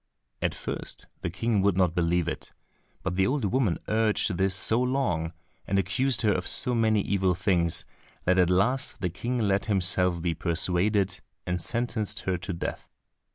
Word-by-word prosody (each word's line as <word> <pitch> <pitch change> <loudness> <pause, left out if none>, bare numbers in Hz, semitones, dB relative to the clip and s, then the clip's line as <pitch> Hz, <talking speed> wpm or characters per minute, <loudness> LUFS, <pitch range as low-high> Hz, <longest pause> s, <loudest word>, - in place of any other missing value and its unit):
At - - 0
first - - -6 0.2
the - - -2
King 105 +3 0
would 100 -2 +2
not 90 -3 +3
believe 85 -1 +1
it, - - -5 0.5
but 90 - -2
the 95 0 +3
old 135 -2 0
woman 110 -4 +1
urged 110 -3 +1
this 95 +1 +2
so 110 +5 +3
long, 125 -12 0 0.4
and 100 - +1
accused 115 +7 +1
her 105 - +4
of - - -2
so 125 - +4
many 110 -3 +2
evil 95 -2 +1
things, 90 -3 0 0.4
that 90 +1 +3
at 90 -1 +4
last 100 +9 +1
the 90 -3 -1
King 120 +8 -3
let 100 -4 +1
himself 90 -4 +2
be 85 0 -1
persuaded 95 +4 0 0.2
and 90 -1 -2
sentenced 115 -2 -1
her 95 - -1
to 95 - -5
death. 85 - -5
95 Hz, 170 wpm, -27 LUFS, 90-110 Hz, 0.5 s, her